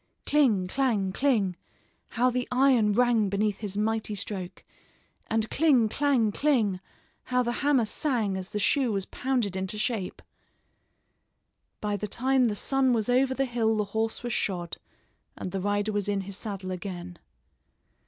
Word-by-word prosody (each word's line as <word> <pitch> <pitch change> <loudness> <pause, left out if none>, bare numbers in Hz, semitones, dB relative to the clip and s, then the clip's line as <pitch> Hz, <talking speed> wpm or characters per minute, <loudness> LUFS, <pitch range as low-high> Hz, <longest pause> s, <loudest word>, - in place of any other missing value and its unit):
Cling, 235 -11 +3
clang, 215 -4 0
cling! 210 -7 +1 0.5
How 250 +2 +1
the 250 0 -2
iron 250 -5 +4
rang 235 -3 +3
beneath 205 +1 0
his 205 -2 -3
mighty 220 0 -1
stroke! 190 -2 -5 0.6
And 220 0 0
cling, 265 -8 +4
clang, 260 -5 +2
cling, 220 -8 +1 0.5
how 250 0 +1
the 240 - -1
hammer 280 -5 +3
sang 220 -4 -1
as 190 -1 -5
the - - -4
shoe 245 +4 +2
was 195 -2 -2
pounded 245 -7 -1
into 190 +2 -3
shape! 215 -4 -2 1.6
By 210 -1 -1
the 210 - -4
time 260 +4 +2
the 215 -3 0
sun 265 +3 +1
was 225 -1 0
over 260 +1 +3
the 270 - +1
hill 225 -3 0
the 210 - +2
horse 220 +1 -1
was 240 -1 -2
shod, 175 -5 -2 0.6
and 185 - -5
the 195 - -3
rider 205 +2 0
was 205 -1 -1
in 200 -1 0
his 195 0 -7
saddle 195 -3 -5
again. 180 -1 -6
215 Hz, 155 wpm, -27 LUFS, 200-250 Hz, 1.6 s, iron